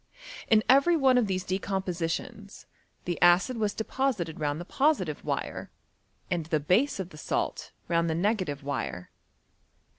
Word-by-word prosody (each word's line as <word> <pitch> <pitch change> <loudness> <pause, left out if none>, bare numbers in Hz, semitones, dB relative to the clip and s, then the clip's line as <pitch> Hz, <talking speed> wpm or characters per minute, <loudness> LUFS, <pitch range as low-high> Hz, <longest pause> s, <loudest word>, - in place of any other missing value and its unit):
In 215 -1 +4
every 280 +6 +5
one 260 -4 +4
of 230 - +1
these 185 -1 -1
decompositions, 190 +1 -3 0.4
the 175 -1 -3
acid 175 +8 +4
was 210 -2 -1
deposited 220 - -2
round 145 0 -1
the 175 - -6
positive 230 - 0
wire, - - -3 0.6
and 170 -3 -1
the 155 -2 +1
base 195 - +2
of 185 -1 -5
the 150 - -12
salt - - -3 0.2
round 170 0 +1
the 160 - 0
negative 180 -6 -1
wire. 135 -10 -4
185 Hz, 145 wpm, -28 LUFS, 165-220 Hz, 0.6 s, every